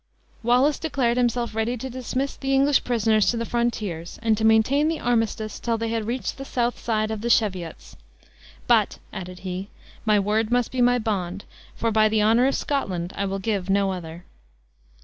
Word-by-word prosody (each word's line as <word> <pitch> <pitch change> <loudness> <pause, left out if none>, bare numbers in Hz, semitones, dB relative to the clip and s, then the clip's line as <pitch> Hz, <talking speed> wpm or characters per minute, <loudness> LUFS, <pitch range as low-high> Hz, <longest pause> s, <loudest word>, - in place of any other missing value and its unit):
Wallace 250 +5 +3
declared 255 -7 0
himself 240 -1 0
ready 225 +3 -1
to 260 - -5
dismiss 260 +2 -3
the 270 0 -1
English 275 +1 +3
prisoners 220 -3 +2
to 235 - 0
the 230 - -2
frontiers, 215 -9 -2
and 225 -1 +3
to 220 - -3
maintain 220 +7 +4
the 325 -1 -1
armistice 225 -3 -1
till 230 -1 -1
they 230 0 -2
had 225 -1 -2
reached 250 +3 -3
the - - -4
south 245 -2 -1
side 215 -1 -1
of 220 -2 -4
the 235 - -2
Cheviots. 185 -8 0 0.7
"But," - - +3 0.2
added 180 0 -7
he, 185 +1 -5 0.4
"my 215 -2 +3
word 215 +2 0
must 245 -1 +1
be 255 - -1
my 245 0 +4
bond, 200 -5 -3 0.3
for 230 - -1
by 215 0 +4
the 215 0 +1
honor 230 +4 +4
of 275 - +1
Scotland 185 -11 -2
I 200 - -1
will 195 0 -2
give 195 -2 -2
no 195 0 +2
other." 175 -1 -7
225 Hz, 190 wpm, -24 LUFS, 200-245 Hz, 0.7 s, maintain